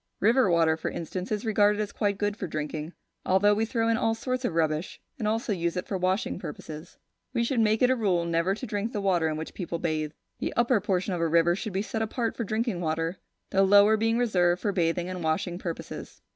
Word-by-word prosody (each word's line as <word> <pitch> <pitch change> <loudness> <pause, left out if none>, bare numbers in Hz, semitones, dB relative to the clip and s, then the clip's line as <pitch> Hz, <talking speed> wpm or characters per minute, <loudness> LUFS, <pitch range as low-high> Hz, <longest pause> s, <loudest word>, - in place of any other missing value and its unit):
River 230 +1 +4
water, 165 -2 +4
for - - -3
instance, 180 +4 -5
is 215 +1 -1
regarded 210 -1 +3
as 210 -1 -2
quite 200 -2 0
good 205 0 -1
for 195 - -4
drinking, 155 +1 -4 0.3
although 195 +3 +4
we 220 +2 +1
throw 225 0 0
into 230 +1 +1
it - - -1
all 225 0 +2
sorts 255 +2 -3
of 190 -9 -1
rubbish, 160 0 0 0.2
and 215 - -1
also 225 0 0
use 170 -1 -1
it 180 - -2
for 200 - -3
washing 185 +2 0
purposes. 160 -4 -8 0.4
We 235 - +2
should 235 +1 0
make 220 +1 +3
it 250 - +5
a - - +3
rule 190 -7 +1
never 170 +3 +1
to 255 - -6
drink 210 +1 -3
the 210 - -1
water 180 -5 +2
in 155 -1 -2
which 160 - -6
people 175 -3 -4
bathe. 155 -2 -2 0.3
The - - -2
upper 240 -2 +3
portion 190 -1 0
of 175 - -2
a 165 - +2
river 170 +1 +3
should 215 +1 -5
be 195 +2 0
set 220 0 -3
apart 225 +1 -1
for 235 - -2
drinking 220 -3 -1
water, 165 +2 -1 0.3
the 195 - +3
lower 205 +2 +6
being 225 +1 +1
reserved 180 -7 +2
for 205 - +1
bathing 175 -1 0
and 185 -2 -5
washing 165 +3 -1
purposes. 170 -3 -7
195 Hz, 235 wpm, -27 LUFS, 170-220 Hz, 0.4 s, lower